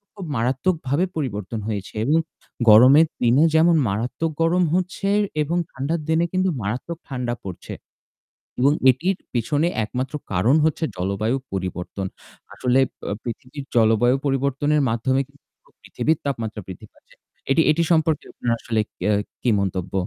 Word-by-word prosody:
খুব 195 - -7
মারাত্মকভাবে 140 +5 0
পরিবর্তন 110 - -3
হয়েছে 100 -3 -4
এবং 155 +5 +3 0.5
গরমের 130 +9 +8
দিনে 125 +6 +4
যেমন 165 +2 +5
মারাত্মক 120 +11 -2
গরম 175 +2 +3
হচ্ছে। 185 +2 -1 0.3
এবং 165 +4 -1
ঠান্ডার 145 +5 -2
দিনে 160 +1 +3
কিন্তু 185 0 +2
মারাত্মক 120 +11 -4
ঠান্ডা 125 -3 -3
পড়ছে। 95 -3 -7 0.9
এবং 140 +3 +5 0.2
এটির 175 +10 0 0.2
পিছনে 145 +7 +1 0.2
একমাত্র 130 +5 -4 0.2
কারণ 110 +11 +3
হচ্ছে 160 +1 0
জলবায়ু 100 +7 -1 0.2
পরিবর্তন। 95 0 -4 0.5
আসলে 125 +1 +1 0.3
আ - - -1
পৃথিবীর 125 +4 -7
জলবায়ু 115 +2 +4
পরিবর্তনের 140 +2 +1
মাধ্যমে 130 +4 +1
কিন্তু 140 0 -27
পুরো - - -29
পৃথিবীর 160 0 -1
তাপমাত্রা 115 -5 -3
বৃদ্ধি 95 - -9
পাচ্ছে। - - -25 0.4
এটি, 160 +4 +4
এটি, 165 +2 +2
সম্পর্কে 160 -2 +2
আপনার 120 - -2
আসলে 110 -2 -1 0.3
আ - - +3 0.3
কি 125 - +2
মন্তব্য? 95 -1 -3
130 Hz, 140 wpm, -22 LUFS, 110-160 Hz, 0.9 s, গরমের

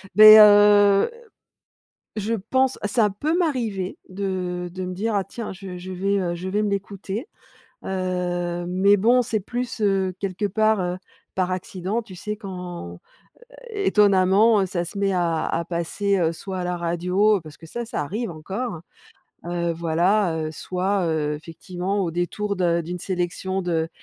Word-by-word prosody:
Beh, 215 0 +11
heu, 205 - +7 1.1
je 215 +2 -1 0.2
pense, 265 0 +2
ça 210 -1 +2
peut 300 - -1
m'arriver 230 - -1
de 185 -2 -3
de 185 +1 -5
me 180 - -5
dire: 215 +3 -2
«Ah 195 - 0
tiens, 230 +2 -6
je 190 -1 -8
je 185 +1 -7
vais, 195 +2 0
heu 175 -2 -1
je 180 +2 -5
vais 210 +3 0
me 210 - 0
l'écouter» 200 - -4 0.6
heu, 180 -2 -2
mais 190 +3 +4
bon, 240 +6 +4
c'est 230 -2 -1
plus, 240 +3 -4
heu, 195 -2 +1
quelque 195 +1 -2
part, 215 +1 +2
heu, 180 0 -2 0.4
par 185 -1 0
accident. 185 +4 -3
Tu 210 -5 -12
sais 210 +4 -5
quand 180 - -7 0.7
étonnamment, 205 - +4
ça 175 -2 -2
se 190 - -7
met 200 0 +1
à 170 -3 0
à 170 - -1
passer, 180 +4 -1
heu, 165 -2 +2
soit 190 +2 -6
à 180 - -2
la 180 0 -1
radio 180 +5 +1
parce 155 -1 -12
que - - -14
ça, 235 +9 -5
ça 225 - -3
arrive 205 +7 -3
encore, 190 +4 -5 0.7
heu, 170 -1 -1
voilà, 170 +3 +1
heu, 155 0 -3
soit, 185 +3 -1
heu, 150 -2 0
effectivement 180 +5 -4
au 180 -3 -1
détour 185 +4 -2
de 170 -2 +1
d'une 175 +2 -5
sélection 185 +1 -2
de 165 -2 -1
190 Hz, 160 wpm, -23 LUFS, 175-210 Hz, 1.1 s, Beh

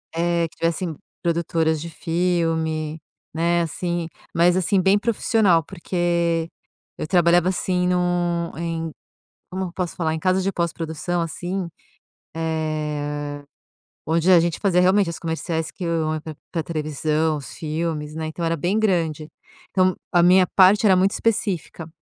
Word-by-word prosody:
Eh, 170 0 +1
que 165 - -24
tivessem 165 -1 -1 0.3
produtoras 165 -2 0
de 170 - -6
filme, 165 -2 -1 0.3
né, 170 +2 +2
assim 170 +1 -2 0.3
mas, 175 +2 +4
assim, 185 +2 +2
bem 195 +2 +4
profissional, 210 -6 +2
porque 170 -2 -1 0.5
eu - - -3
trabalhava, 175 0 +4
assim, 180 -1 0
no 175 -1 0
em 165 -1 -3 0.6
como 190 +1 -3
eu 175 - -8
posso 180 -1 -3
falar? 160 -2 -1
Em - - -2
casa 185 +3 +2
de 190 +1 0
pós-produção, 170 -1 -2
assim, 175 +2 -3 0.7
eh, 150 -2 -3 0.6
onde 165 +3 +2
a 175 - +8
gente 170 0 0
fazia 190 -4 +2
realmente 185 0 +4
os 170 - -5
comerciais 165 -1 -3
que 185 - -8
iam 160 -2 0
pra 155 -2 -8 0.2
pra 165 - -1
televisão, 155 0 -1
os 140 - -9
filmes, 155 -1 -3
né, 160 0 -4
então 165 +2 -4
era 165 - +1
bem 175 +7 0
grande. 165 -7 0 0.4
Então 185 -1 +3 0.2
a 175 - +4
minha 180 +1 +6
parte 195 +3 +6
era 190 -2 +6
muito 190 +2 +3
específica. 195 -7 -2
170 Hz, 145 wpm, -22 LUFS, 160-180 Hz, 0.7 s, a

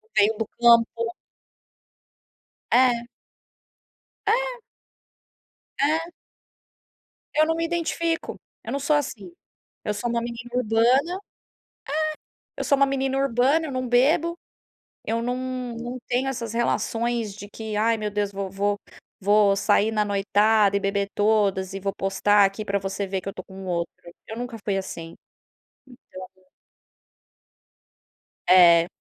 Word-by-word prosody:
Veio 210 +2 +4
do 225 - -1
campo. 230 -1 +4 1.6
É. 240 -1 +3 1.2
É. - - +1 1.2
É. 315 +4 +1 1.3
Eu 310 - +5
não 325 +1 0
me 330 0 -1
identifico, 335 0 -2 0.2
eu - - -6
não 280 - -1
sou 290 +2 +2
assim. 220 -10 -3 0.5
Eu 210 - -1
sou 210 +4 -3
uma 235 0 0
menina 235 0 -6
urbana 250 +8 +2 1.4
é! - - -3
Eu - - -1
sou 280 - +4
uma 275 - +5
menina 270 0 -1
urbana, 275 +4 +2
eu - - -5
não 255 -1 -2
bebo, 315 +8 +3 0.7
eu 230 +1 -1
não 245 +1 -1 0.4
não 240 +2 -5
tenho 250 +2 0
essas 230 -4 -4
relações 230 -1 -1
de 205 0 -10
que: 215 0 -6
"Ai, 225 +2 +2
meu 210 -1 -3
Deus, 205 -1 -2
vo 195 -1 -4
vo 200 +1 -1 0.4
vou 205 0 +4
sair 205 +1 +3
na 215 -1 +2
noitada 205 +1 +3
e - - 0
beber 200 0 -1
todas 200 -3 +1
e 195 - -4
vou 195 +1 -2
postar 200 +1 +3
aqui 195 +2 -5
pra 200 -1 0
você 195 +1 -3
ver 190 0 -2
que 190 - -7
eu 195 - -5
tô 185 - -8
com 190 0 -10
outro.", 170 -1 -2 0.3
eu 220 - -7
nunca 245 -1 -5
fui 200 -2 0
assim. 165 -3 -7 1.2
Então 185 - -27 2.1
É. 170 -2 +7
225 Hz, 135 wpm, -24 LUFS, 200-255 Hz, 2.1 s, É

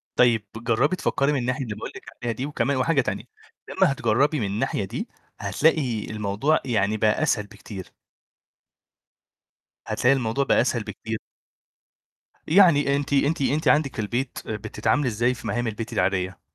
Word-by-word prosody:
طيب، 115 -4 +4
جرّبي 120 +8 +1
تفكّري 140 -4 +1
من 145 - +1
الناحية 125 +3 -1
اللي 110 -4 -5
باقُول 105 - -6
لِك - - -10 0.2
عليها 120 - 0
دي، 130 +5 -3
وكمان 140 -2 0
وحاجة 135 +2 +2
تانية، - - -3 0.5
لمّا - - +3
هتجرّبي 135 +5 +1
من 110 - -1
الناحية 100 0 -1
دي - - -5 0.3
هتلاقي 135 -9 +1
الموضوع 105 +8 +1
يعني 110 -3 +1
بقى 105 0 +2
أسهل 105 - +1
بكتير. 100 -2 -10 2.0
هتلاقي 125 +2 +3
الموضوع 125 +1 0
بقى - - +3
أسهل 120 -2 0
بكتير. 110 +1 -5 1.3
يعني 155 -6 +5
أنتِ 140 0 -2
أنتِ 140 +2 +2
أنتِ 145 +3 +1
عندِك 145 -3 +3
في - - -2
البيت، 120 +5 -2
بتتعاملي 110 +6 -1
ازاي 120 +2 +1
في 115 - -8
مهام 120 0 -1
البيت 115 +2 -5
العادية؟ 95 -1 0
120 Hz, 150 wpm, -24 LUFS, 110-140 Hz, 2.0 s, يعني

